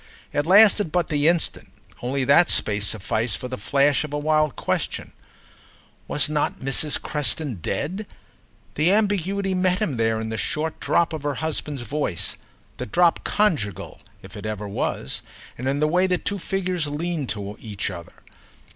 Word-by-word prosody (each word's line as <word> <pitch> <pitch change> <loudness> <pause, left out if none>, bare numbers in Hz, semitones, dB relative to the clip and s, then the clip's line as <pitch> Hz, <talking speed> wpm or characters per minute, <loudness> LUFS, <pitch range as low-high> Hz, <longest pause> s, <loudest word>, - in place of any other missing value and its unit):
It 145 +1 0
lasted 205 -2 +6
but 175 -1 +1
the 145 0 +2
instant, 170 -1 +1 0.3
only 130 +2 -1
that 145 +6 +5
space 105 -1 +3
sufficed 110 +2 -1
for 125 - -5
the 130 - -4
flash 140 +1 +2
of 150 - -6
a - - 0
wild 155 -1 +2
question. - - -2 1.0
Was 140 -3 +1
not 150 -1 -1
Mrs. 135 +3 +1
Creston 150 - -2
dead?—the 175 - -4
ambiguity 200 -2 +1
met 185 0 +2
him 185 - -1
there 115 -1 +1
in 110 0 -4
the 110 - -3
short 155 +6 -2
drop 170 -1 +1
of 155 - -4
her 145 -1 -2
husband's 150 -4 -3
voice, 135 - -2 0.4
the - - -5
drop 170 - +3
conjugal, 145 - -1 0.2
if - - -12
it - - -6
ever 105 -1 -4
was, 100 -8 -2 0.3
and 130 +2 -3
in 140 +1 0
the 150 - +3
way 180 +4 +3
the 180 -1 +2
two 200 +3 -3
figures 185 -3 -1
leaned 150 -1 -3
to 100 0 -4
each 105 -3 -4
other. 85 -2 -9
150 Hz, 165 wpm, -23 LUFS, 120-175 Hz, 1.0 s, lasted